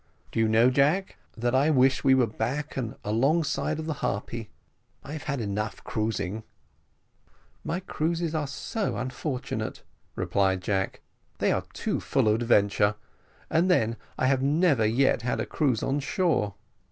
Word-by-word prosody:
"Do - - -2
you 110 - +4
know, 115 +3 +5
Jack, 150 +9 +2 0.2
that 120 +2 0
I 135 +4 +4
wish 135 -3 +3
we 135 -1 +6
were 130 -2 +4
back 125 +7 -3
and 120 -4 -3
alongside 140 +8 +1
of 160 - -4
the 160 - -1
_Harpy; 115 -2 -3 0.6
_I've 150 +2 -6
had 140 -4 -2 0.4
cruising 105 -3 -2
enough." 110 0 -6 1.2
"My 175 +3 -2
cruises 165 -2 -1
are 155 -2 -1
so 205 - -3
unfortunate," 130 +2 -4 0.3
replied 95 -2 +1
Jack; 95 0 -1 0.4
"they - - +2
are - - 0
too - - -1
full - - +1
of 110 +2 +2
adventure; 105 -2 +3 0.5
but 165 +3 +2
then, 115 -11 +2 0.2
I - - +1
have 130 0 +3
never 140 -5 +3
yet 125 +3 +2
had 120 +1 -1
a - - -1
cruise 130 -8 0
on 140 +2 0
shore. 145 - 0
130 Hz, 155 wpm, -27 LUFS, 110-150 Hz, 1.2 s, we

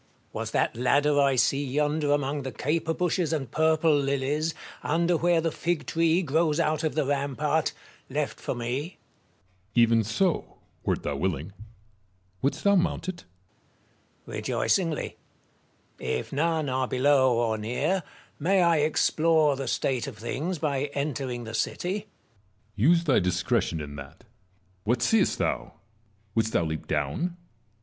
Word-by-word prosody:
Marizts. - - -38
Was - - -3
that - - +1
ladder 145 +4 +3
I 140 -1 +4
see 135 +3 +2
yonder 145 +2 0
among 145 0 0
the 130 -1 -5
caper 160 +5 -1
bushes 180 -2 0
and 135 -7 -2
purple 160 0 +3
lilies, 140 +3 0 0.3
under 170 +3 +1
where 170 0 +3
the 165 0 0
fig 170 +1 -2
tree 165 +2 +2
grows 155 +1 +1
out 155 -1 +1
of 155 - -1
the 155 -3 +1
rampart, 145 +2 0 0.4
left 145 +2 -2
for - - -3
me? 120 +3 -2
Metellus. 165 +5 -9 0.8
Even 115 -1 +5
so, 145 - -1 0.3
wert - - -1
thou 70 - -2
willing. 85 +2 -2 0.9
Wouldst 140 - -1
thou 200 0 +5
mount 180 -1 0
it 175 - -7 1.0
1 - - -14
Marius. - - -4
Rejoicingly. 165 -5 0 0.8
If 65 - -3
none 160 +1 +1
are 130 0 0
below 130 -1 +3
or 115 -2 0
near, 140 - 0 0.4
may 185 +4 +3
I 170 -1 +4
explore 155 0 +3
the 135 0 -5
state 130 -4 0
of - - -7
things 150 +10 -3
by 145 -2 -1
entering 135 -4 -2
the 110 0 -7
city? 175 - -1
Metellus. 210 +1 -6 0.7
Use 165 +11 +4
thy 145 -6 +3
discretion 90 -2 0
in 70 -1 -7
that. 70 +3 -11 0.6
What 120 +3 +1
seest 220 - +3
thou? - - -2 0.6
Wouldst 110 0 0
thou - - +3
leap 80 -1 -4
down 75 - -1
145 Hz, 150 wpm, -27 LUFS, 125-165 Hz, 1.0 s, Even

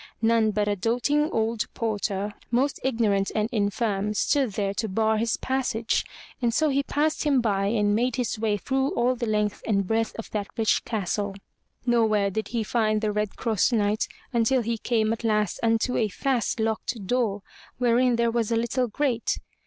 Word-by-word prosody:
None 225 -1 +4
but 210 -1 0
a 205 - +1
doting 245 - +1
old 225 -2 -1
porter, 205 -2 -2 0.2
most 260 +4 +1
ignorant 215 -6 +1
and 215 0 +1
infirm, 210 -1 0
stood 265 -1 +1
there 200 -1 -1
to 220 +2 -2
bar 220 +2 +1
his 230 0 0
passage; 250 -4 0 0.4
and 240 -1 +2
so 310 +6 +2
he 280 0 +2
passed 300 +2 0
him 285 -3 +3
by 200 -4 +1
and 205 -1 +2
made 240 +3 +1
his 245 -3 -2
way 215 -2 +1
through 270 +6 -1
all 245 +2 +2
the 240 -2 -3
length 210 -1 0
and 200 -3 +1
breadth 225 +3 0
of 225 - -7
that 205 -2 -2
rich 225 -1 +2
castle. 205 -2 -2 0.5
Nowhere 220 -4 +2
did 220 +3 -3
he 230 -2 -2
find 215 -1 +1
the 215 -1 0
Red 210 0 -2
Cross 225 +1 +1
Knight 210 -1 +1 0.3
until 235 +2 +2
he 230 0 -2
came 220 -2 +1
at 230 - -6
last 210 -3 +1
unto 230 +2 +1
a 220 - +2
fast 245 +3 -1
locked 220 -1 -2
door, 210 -3 0 0.3
wherein 245 0 +3
there 235 0 +2
was 230 -1 -1
a - - +3
little 235 +2 0
grate. 240 0 0
225 Hz, 185 wpm, -25 LUFS, 210-240 Hz, 0.5 s, None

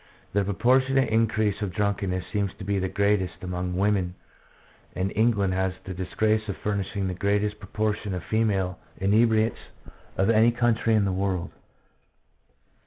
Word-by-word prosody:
The 100 0 +2
proportionate 130 +6 +2
increase 110 -2 +1
of 100 -4 -3
drunkenness 100 -2 -1
seems 100 -2 0
to 105 - -9
be 100 0 0
greatest 100 -3 0
among 90 0 -3
women, 95 -3 +1 0.8
and 95 +2 -1
England 105 -4 +2
has 95 0 0
the 95 - -6
disgrace 105 +4 0
of 100 - -3
furnishing 100 -1 -2
the 90 - -2
greatest 105 +2 0
pro - - -12
portion 105 -2 -1
of 90 - -5
female 100 -5 0 0.2
inebriates 110 +3 +2 0.6
of 95 +4 +3
any 115 +1 +5
country 115 -1 +2
in 105 -2 +3
the 95 - 0
world. 95 -2 -1
100 Hz, 145 wpm, -26 LUFS, 95-110 Hz, 0.8 s, any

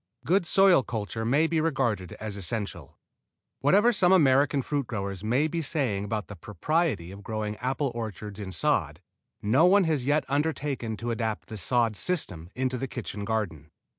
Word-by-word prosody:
Good 175 +4 +2
soil 190 -5 +6
culture 115 -1 -4
may 140 +7 +3
be 160 -1 +1
regarded 120 - -1
as 110 -2 -6
essential. 100 - -4 0.6
Whatever 205 - +4
some 185 -3 +3
American 140 -5 +4
fruit 140 -3 -2
growers 100 -3 -4
may 125 +8 +2
be 165 +1 -2
saying 130 -10 -1
about 105 0 -3
the 105 - -8
propriety 105 - -1
of 100 +1 -10
growing 105 0 -3
apple 130 +2 -1
orchards 105 -3 -6
in 100 -2 -5
sod, 90 - 0 0.4
no 130 +12 +4
one 200 +2 +5
has 150 -6 0
yet 150 +2 +2
undertaken 140 -5 -1
to 120 +2 -3
adapt 110 -2 -3
the 110 - -6
sod 115 +1 +1
system 90 - -2
into 130 -1 -1
the 135 - -3
kitchen 105 -5 -5
garden. 95 -9 -3
120 Hz, 165 wpm, -27 LUFS, 105-150 Hz, 0.6 s, soil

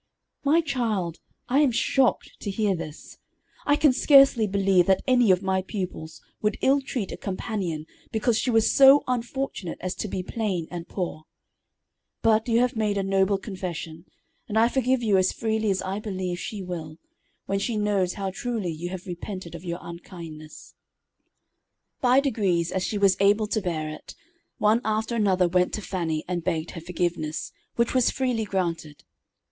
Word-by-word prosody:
"My 305 +4 +4
child, 225 - -2 0.3
I 265 +3 +3
am 295 -3 +5
shocked 260 +2 +1
to 205 - -5
hear 200 0 +1
this. 155 -2 -9 0.5
I 290 - +5
can 295 -3 +4
scarcely 275 -5 +6
believe 195 -2 +3
that 190 -1 +3
any 245 -4 +4
of 185 +1 +4
my 190 0 +1
pupils 185 -5 -6 0.2
would 210 -1 0
ill 275 +1 +4
treat 245 -7 -4
a - - -6
companion 185 -5 -3 0.3
because 220 +1 +1
she 255 - -1
was 225 -2 +3
so 275 +1 +8
unfortunate 245 -6 -3
as 185 0 -3
to - - -3
be 185 -2 -3
plain 190 -6 -2
and 175 -1 -6
poor. 170 -4 -4 1.0
But 220 0 +3
you 230 +1 +4
have 250 -1 +1
made 210 -2 0
a 195 - 0
noble 195 +1 +2
confession, 180 -5 -6 0.4
and 215 - -1
I 230 +1 +5
forgive 260 -1 +1
you 205 -4 +4
as 185 - +2
freely 220 -1 -1
as 190 -1 0
I 190 +2 -3
believe 185 -4 -4
she 205 -1 -5
will, 160 -4 -6 0.5
when 195 0 -1
she 220 +2 -1
knows 200 -3 +1
how 195 -2 -3
truly 215 -3 -3
you 165 +3 -5
have 185 -1 -7
repented 180 -1 -6
of 170 0 -8
your 170 -1 -3
unkindness." 165 -3 -10 1.3
By 255 +1 +5
degrees, 195 - 0
as 185 0 -1
she 210 - -2
was 195 -2 +4
able 205 +2 +4
to 215 +1 -1
bear 165 -5 -2
it, 155 - -9 0.4
one 215 +3 +3
after 220 +2 -1
another 190 -5 +3
went 180 +1 +1
to 215 - -5
Fannie 165 -5 -2
and 175 -2 -2
begged 160 0 -2
her 165 - -8
forgiveness, 170 -2 -2 0.2
which 235 0 +1
was 255 -2 +4
freely 250 -4 -1
granted. 170 -6 -3
195 Hz, 175 wpm, -25 LUFS, 175-225 Hz, 1.3 s, so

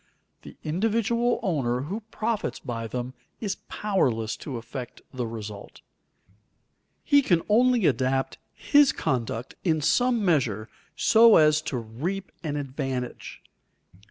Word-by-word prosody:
The - - -13
individual 225 +7 +1
owner 130 -9 0
who 180 +11 -4
profits 225 -1 -2
by 115 -3 -5
them 125 +2 -4 0.3
is 205 -3 -3
powerless 125 - 0
to 135 -5 -6
affect 120 +2 -8
the 125 -2 -3
result. 105 -3 -8 1.2
He 285 -1 +5
can 175 -10 +2
only 240 0 +4
adapt 135 -1 0 0.2
his 290 -1 +4
conduct 120 -1 -2
in 160 -4 +2
some 240 - +2
measure 120 - +1 0.3
so 230 0 +6
as 155 -1 +5
to 130 - -2
reap 145 - -4
an 150 -3 -2
advantage. 135 -3 -5
150 Hz, 120 wpm, -26 LUFS, -, 1.2 s, so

